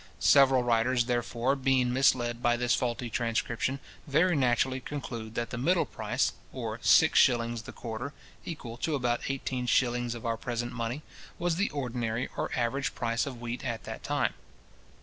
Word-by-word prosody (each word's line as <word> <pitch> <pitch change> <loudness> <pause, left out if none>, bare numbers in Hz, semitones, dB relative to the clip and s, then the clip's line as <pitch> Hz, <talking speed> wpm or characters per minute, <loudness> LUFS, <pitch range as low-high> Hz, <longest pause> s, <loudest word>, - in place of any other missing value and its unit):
Several 135 -2 +5
writers, 120 +1 +2
therefore, 120 +1 0
being 130 -2 +2
misled 120 -2 +2
by 120 0 +3
this 120 0 +1
faulty 120 0 -1
transcription, 120 +3 -1 0.3
very 165 +5 +3
naturally 130 -1 +2
conclude 120 -5 -6
that 120 - -2
the 120 - -4
middle 170 +7 +2
price, - - -1 0.2
or - - -5
six - - +6
shillings 120 -2 +3
the - - -9
quarter, 120 +4 -5 0.3
equal 120 -8 -7
to 155 +4 -1
about 120 -3 0
eighteen 130 -2 -2
shillings 120 -1 +1
of 115 - -8
our 115 -1 0
present 120 +1 -3
money, 120 +4 -3 0.3
was 170 -1 0
the 200 - +1
ordinary 120 -4 -2
or - - -2
average 135 +4 -1
price 115 +3 0
of 130 -4 -6
wheat 120 +1 -5
at 115 -4 -3
that - - -7
time. - - 0
120 Hz, 165 wpm, -29 LUFS, 120-135 Hz, 0.3 s, six